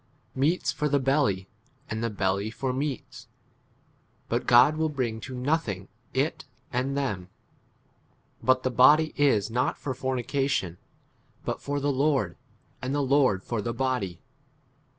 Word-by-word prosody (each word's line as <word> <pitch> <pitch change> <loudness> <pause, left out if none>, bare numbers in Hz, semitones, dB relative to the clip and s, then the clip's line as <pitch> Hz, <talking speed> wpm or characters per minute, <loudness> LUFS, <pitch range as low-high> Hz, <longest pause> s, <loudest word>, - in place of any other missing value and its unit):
13 130 - -4
Meats 180 - 0
for 150 - -1
the 145 - +3
belly, 130 -9 +1 0.4
and 110 +1 -3
the 115 - 0
belly 100 0 -1
for 130 +3 -3
meats; 135 0 -4 1.0
but - - -1
God 120 +6 +7
will 160 0 0
bring 125 -6 -2
to 130 - -7
nothing 125 - -1 0.2
it - - -1 0.3
and 130 +3 0
them: 95 -10 -2 1.1
but 130 0 +3
the 130 - 0
body 150 +6 +5
[is] 115 -8 +2
not 125 +3 0
for 135 - -4
fornication, 130 - -1 0.7
but - - -3
for 145 0 -2
the 145 +1 +1
Lord, 135 - +1 0.5
and 130 +3 -2
the 145 - +1
Lord 130 -8 +3
for 115 -3 -2
the 115 +2 -3
body. 120 -9 -1
130 Hz, 145 wpm, -27 LUFS, 110-140 Hz, 1.1 s, God